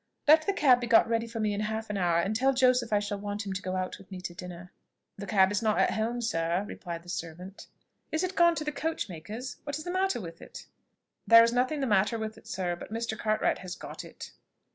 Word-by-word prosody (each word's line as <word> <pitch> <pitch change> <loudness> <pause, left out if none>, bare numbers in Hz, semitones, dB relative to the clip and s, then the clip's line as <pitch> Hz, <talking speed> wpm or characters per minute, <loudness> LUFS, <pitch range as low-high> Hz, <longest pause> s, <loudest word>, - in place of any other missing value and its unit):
"Let 310 +3 +6
the 400 - +2
cab 260 -9 +4
be 240 - -2
got 230 -1 +6
ready 230 0 0
for 230 0 -6
me 215 -1 +1
in 200 - -3
half 220 0 -3
an - - -3
hour: 175 -3 +2
and 195 +5 0
tell 265 +4 +2
Joseph 250 -2 +3
I 210 - +4
shall 205 0 -2
want 205 +1 -4
him 195 - -3
to 190 - -4
go 185 -1 -3
out 185 0 -3
with 195 - -16
me 190 -2 -7
to 180 - -6
dinner." 180 -1 -9 0.5
"The 200 0 -7
cab 190 -1 +4
is 205 - 0
not 215 -2 +1
at - - +3
home, 230 +2 -1
sir," 170 -3 0
replied 170 -2 -7
the - - -19
servant. 180 +2 -7 0.4
"Is 315 - 0
it 370 +1 -2
gone 340 0 +5
to 310 - -3
the 300 - -2
coach 320 -1 -2
maker's? 215 +10 -7
What 285 0 -4
is 310 - -7
the 355 - -4
matter 380 -4 +1
with 170 -4 -9
it." - - -10 0.6
"There 230 0 +9
is 230 0 +2
nothing 255 +4 +1
the - - +1
matter 210 0 +2
with 220 0 -4
it, 220 - -17
sir; 180 -2 -2
but 175 - -10
Mr. 225 0 -2
Cartwright 215 -1 0
has 180 -1 -6
got - - -8
it." - - -10
215 Hz, 255 wpm, -29 LUFS, 185-245 Hz, 0.6 s, There